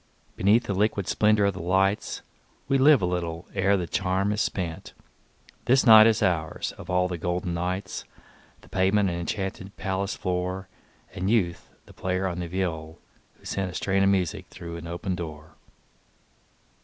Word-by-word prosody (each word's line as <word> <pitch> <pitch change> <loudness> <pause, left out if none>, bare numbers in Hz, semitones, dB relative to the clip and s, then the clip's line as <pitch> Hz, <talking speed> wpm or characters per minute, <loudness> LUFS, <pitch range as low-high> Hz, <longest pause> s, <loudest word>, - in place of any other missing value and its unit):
Beneath 105 +5 +4
the 100 - -3
liquid 100 -1 0
splendor 105 -1 +3
of 100 - +1
the 95 - -7
lights 95 +3 0 0.4
We 135 0 +2
live 140 -5 +6
a - - +4
little 85 -2 -3
ere 100 +1 +2
the 90 - -2
charm 95 +3 0
is 105 0 0
spent; 85 -4 -3 0.7
This 130 +2 +4
night 110 -2 +9
is 110 -1 +2
ours, 85 -5 -1
of 85 - -11
all 90 0 +2
the 90 -2 -5
golden 90 +1 -2
nights, 90 +3 -3 0.6
The - - -19
pavement 95 +1 +2
an 85 - -3
enchanted 95 +2 -4
palace 95 0 -2
floor, 90 +1 -3 0.5
And 95 +2 -2
Youth 90 -7 0 0.2
the - - -16
player 95 +1 -2
on 90 -2 -2
the 90 - -3
viol, 85 -3 -3 0.4
who - - -23
sent 95 -2 -2
A 90 - -9
strain 95 +1 +1
of 95 - +4
music 95 -4 0
through 85 -1 -8
an 85 0 -8
open 85 +3 -3
door. 80 -3 -7
95 Hz, 170 wpm, -26 LUFS, 85-100 Hz, 0.7 s, night